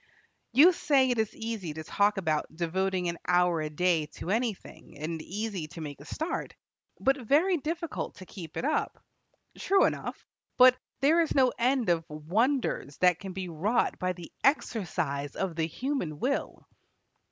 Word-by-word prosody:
You 330 +8 +7
say 275 -6 +3
it 240 - 0
is 220 -1 -1
easy 220 -9 -4
to 160 - -6
talk 205 +5 +2
about 160 -5 0
devoting 180 +2 -1
an 170 0 -3
hour 180 -2 +3
a 155 - -2
day 160 0 +1
to 180 - -4
anything, 225 -8 -3
and 160 +2 -4
easy 200 -3 -4
to 165 +1 -9
make 145 -3 -7
a - - -12
start, 315 - -4 0.4
but 270 +1 +2
very 320 - +3
difficult 330 +2 -4
to 185 - -11
keep 170 -5 -9
it - - -2
up. 310 - 0 0.6
True 390 0 +4
enough, - - -3 0.3
but 255 0 +8 0.3
there 315 +5 +5
is 325 - -1
no 260 -3 +4
end 250 -3 +2
of 170 -1 +2
wonders 180 - -1
that 180 -2 +4
can 195 -2 -7
be 190 -1 -4
wrought 190 +9 0
by 185 0 0
the 175 -2 -11
exercise 160 - 0
of 190 -4 -2
the 160 -1 0
human 245 - -3
will. 275 +7 -2
190 Hz, 165 wpm, -29 LUFS, 165-260 Hz, 0.6 s, but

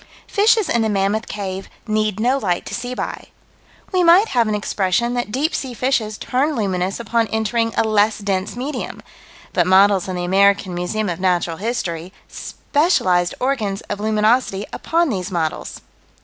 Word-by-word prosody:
Fishes 420 -1 +3
in 235 -7 +1
the 220 - +1
Mammoth 205 +2 0
Cave 195 -2 -5 0.2
need 215 -2 0
no 255 +5 +2
light 180 -7 -1
to - - -7
see 245 +1 -4
by. - - -5 0.6
We 365 -2 +2
might 355 +6 +6
have 235 -3 +2
an 215 - 0
expression 205 +3 0
that 245 -3 -2
deep 285 +7 0
sea 255 -3 -3
fishes 230 -4 0
turn 280 +4 0
luminous 190 -3 -1
upon 230 -1 0
entering 225 +1 0
a - - +4
less 215 0 +2
dense 195 -1 -2
medium 270 +5 -5 0.5
but - - +2
models 195 0 +5
in 185 - -3
the 175 - -3
American 195 0 +3
Museum 180 +5 -2
of 175 -2 -3
Natural 175 -3 0
History: 185 -6 -3 0.2
specialized 185 - 0
organs 225 -7 -1
of 205 - -3
luminosity 215 -1 +1
upon 335 0 +1
these 185 -6 -3
models. 165 -4 -3
215 Hz, 165 wpm, -20 LUFS, 190-245 Hz, 0.6 s, might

